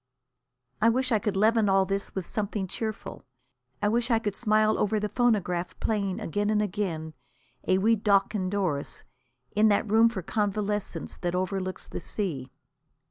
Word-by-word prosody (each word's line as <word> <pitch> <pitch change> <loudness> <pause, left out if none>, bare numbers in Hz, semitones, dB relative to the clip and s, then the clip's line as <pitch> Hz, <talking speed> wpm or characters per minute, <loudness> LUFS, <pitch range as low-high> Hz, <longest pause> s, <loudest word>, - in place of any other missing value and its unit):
I 225 - +6
wish 255 +2 +1
I 220 - +4
could 205 -1 -2
leaven 220 0 +3
all 195 0 +4
this 195 +1 -3
with 190 -3 -3
something 205 -1 -2
cheerful. 215 +3 -5 0.6
I - - +4
wish 235 +3 +1
I 230 - +4
could 210 -3 -2
smile 215 -1 +2
over 215 +1 +1
the 210 - -1
phonograph 180 -8 0
playing 200 -2 -1
again 205 0 -1
and 215 -1 +2
again 180 -6 -2 0.5
A 185 - +4
Wee 220 +4 +4
Deoch 200 -1 +2
an' 185 -3 -1
Doris 180 -8 -2 0.5
in 215 +1 +5
that 210 +1 +2
room 225 +2 +5
for 200 -6 -5
convalescents 205 +1 -2
that 175 -1 -2
overlooks 185 0 -2
the - - -5
sea. 150 -11 -4
205 Hz, 165 wpm, -27 LUFS, 190-215 Hz, 0.6 s, I